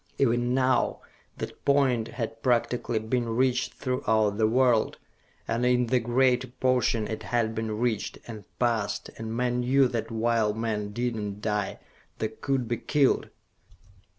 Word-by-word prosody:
Even 120 -1 +2
now 130 -1 +1 0.4
that - - -7
point 130 -5 +2
had 115 -2 -5
practically 120 -1 +1
been 115 +2 -1
reached 125 +2 +1
throughout 110 -5 0
the 110 - +4
world, 120 -1 +2 0.5
and 115 +2 -1
in 125 0 +3
the 125 +2 +2
greater 125 +2 +2
portion 125 -3 +1
it 110 - -4
had 115 -2 0
been 110 -1 -3
reached, 115 -2 -1
and 110 -3 -8
passed, 115 -4 0
and 115 0 -4
men 125 0 0
knew 130 +2 +4
that 115 -2 -3
while 115 -2 +1
men 110 -2 -2
did 120 +2 -2
not 105 -2 -4
die, 105 -2 -1 0.4
they 110 - -1
could 130 +2 -2
be 120 +1 -1
killed! 145 +1 +2
120 Hz, 150 wpm, -27 LUFS, 110-125 Hz, 0.5 s, the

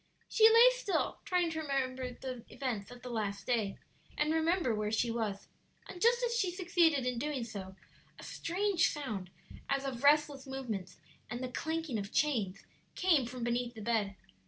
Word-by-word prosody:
She 440 0 +6
lay 460 +2 +8
still, - - -1
trying 355 -2 +1
to 320 - -3
recall 275 -4 -1
the 255 -1 -6
events 240 -7 -3
of 245 0 -12
the 250 - -6
past 200 -3 -2
day 220 -5 0 0.4
and 300 +1 +2
remember 320 -4 +2
where 210 -1 -1
she 230 +2 +1
was; 215 -4 -3 0.4
and 355 - -9
just 475 +2 +4
as 475 -1 +1
she 395 -6 +1
succeeded 345 -6 +2
in 250 -2 -1
doing 285 -2 -2
so 195 -4 -7 0.4
a - - -11
strange 370 0 +1
sound, 215 - -4 0.4
as 275 0 0
of 260 -1 -4
restless 290 -2 +4
movements 240 -9 -5 0.3
and 240 - -4
the 255 - -3
clanking 320 -5 -2
of 200 +1 -6
chains, 215 -11 0 0.3
came 320 -10 +3
from 245 0 -6
beneath 240 0 -1
the 220 - -8
bed. 210 -3 0
260 Hz, 175 wpm, -33 LUFS, 225-325 Hz, 0.4 s, lay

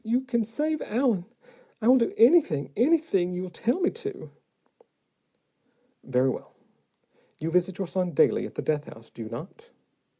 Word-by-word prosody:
You 235 +3 +1
can 240 -3 -1
save 300 +8 -2
Allen. 225 -6 0 0.5
I 220 - -1
will 255 +1 +7
do 230 - +1
anything, 225 - +4
anything 245 - +2
you 180 0 -5
tell 235 - -1
me 360 - +2
to." 435 -3 -7 1.7
"Very 130 0 +1
well. - - -9 0.8
You 160 +2 -3
visit 180 +2 +1
your 195 - -2
son 180 0 -2
daily - - +3
at - - -15
the - - -4
death 150 -1 -1
house, 115 0 -14
do - - -10
you 110 - -6
not?" 185 - -9
210 Hz, 160 wpm, -26 LUFS, 165-265 Hz, 1.7 s, will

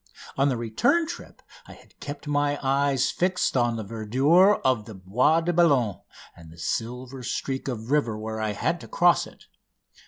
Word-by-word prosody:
On 135 +1 +2
the 130 - -1
return 120 - +1
trip - - -10 0.2
I - - -11
had - - -20
kept 145 0 -7
my 145 0 0
eyes 135 0 +1
fixed 180 -3 0
on 120 -2 +2
the 110 - -4
verdure 130 - +3
of 125 -5 +2
the 110 - -10
Bois 125 - +2
de 175 +1 -1
Boulogne 140 - +2 0.3
and 80 -2 -14
the 85 - -15
silver 125 +8 -4
streak 135 +2 -4
of 120 -1 -5
river 130 -8 +1
where 110 0 -5
I 110 -1 -1
had - - -2
to - - -10
cross - - +3
it. - - -18
130 Hz, 180 wpm, -25 LUFS, 110-145 Hz, 0.3 s, verdure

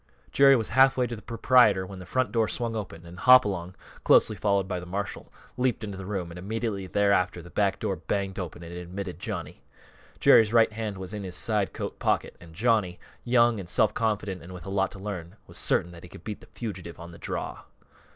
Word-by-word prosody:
_" - - -29
Jerry 135 0 +6
was 115 -4 -1
halfway 130 +1 +4
to 120 - -4
the 110 - -11
proprietor 115 -5 +4
when 95 0 -9
the 90 - -10
front 130 -2 0
door 110 -1 +2
swung 115 0 -3
open 90 -6 -6
and 85 +1 -11
Hopalong, 100 -8 +5 0.3
closely 110 - +5
followed 100 -1 +1
by 90 -2 -3
the 90 - -9
marshal, 100 +3 -5 0.3
leaped 125 -3 0
into 100 -2 -5
the 95 -1 -8
room, 95 -4 -3
and 85 - -9
immediately 105 0 -3
thereafter 90 -2 +2
the 85 - -13
back 100 -2 +1
door 95 - -2
banged 100 -1 -3
open 85 -1 -6
and 85 +1 -9
admitted 90 +2 -6
Johnny. - - -5 0.6
Jerry's 110 0 +6
right 115 -2 +5
hand 105 -2 -4
was 95 +1 -6
in 105 - -4
his 90 -2 -5
side 105 -3 0
coat - - -6
pocket - - 0
and 80 -2 -14
Johnny, 105 -4 +1 0.2
young 120 -2 +3
and 90 -3 -8
self 105 - +3
confident, 105 -4 -1
and 90 +2 -10
with 90 - -10
a - - -6
lot 95 0 +1
to - - -10
learn, 95 -2 -6
was - - -8
certain 85 - +1
that 85 -1 -12
he 90 - -12
could - - -13
beat 105 -1 -6
the - - -15
fugitive 95 -8 -7
on 85 +1 -9
the 85 - -13
draw. - - -4
100 Hz, 220 wpm, -27 LUFS, 90-110 Hz, 0.6 s, Jerry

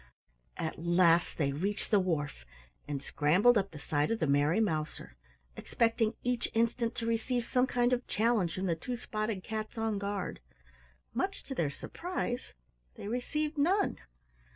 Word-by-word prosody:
At 160 - -3
last 170 -1 +4
they 140 -3 +1
reached 195 +12 -2
the 205 - +6
wharf 150 - -1 0.4
and 140 -2 -3
scrambled 180 - +4
up 200 -2 +2
the 160 - -10
side 145 0 0
of 230 - +1
the 185 - +1
Merry 145 +6 +3
Mouser, 155 - -2 0.4
expecting 230 -1 +1
each 245 -1 0
instant 230 +1 +1
to 230 - -3
receive 230 +1 0
some 250 0 +2
kind 245 -1 +2
of 250 0 -1
challenge 215 -6 +1
from 185 - -2
the 175 - +2
two 245 +9 -4
spotted 215 -4 -3
cats 220 +1 -4
on 225 -2 0
guard. 200 -2 -3 0.7
Much - - -2
to - - -6
their 160 -4 0
surprise 250 - -4 0.4
they - - -7
received 295 +6 -2
none. 380 +7 +2
215 Hz, 155 wpm, -32 LUFS, 165-240 Hz, 0.7 s, the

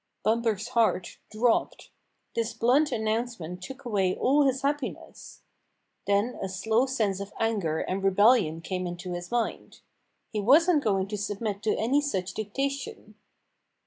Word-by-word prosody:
" - - -52
Bumper's 225 -1 +1
heart 230 -7 +1
dropped. 225 +2 0 0.4
This 230 -1 -2
blunt 255 +7 +3
an 220 - -2
nouncement 215 -6 -3
took 265 +7 -9
away 195 -5 +1
all 280 +2 +3
his 265 +1 -1
happiness. 285 -2 -4 0.6
Then 200 +5 +1
a 195 - -3
slow 220 +7 +1
sense 215 -7 0
of 200 0 -6
anger 200 -9 0
and 190 +1 -2
rebellion 195 -4 +4
came 180 +1 -3
into 175 +1 -6
his 175 0 -6
mind. 240 -1 -3 0.5
He 215 - -2
wasn't 300 - +5
going 195 -4 +1
to 210 -1 -3
submit 205 0 -3
to 215 - +1
any 265 +6 +2
such 190 -10 -2
dictation. 275 - -4
220 Hz, 145 wpm, -27 LUFS, 195-250 Hz, 0.6 s, wasn't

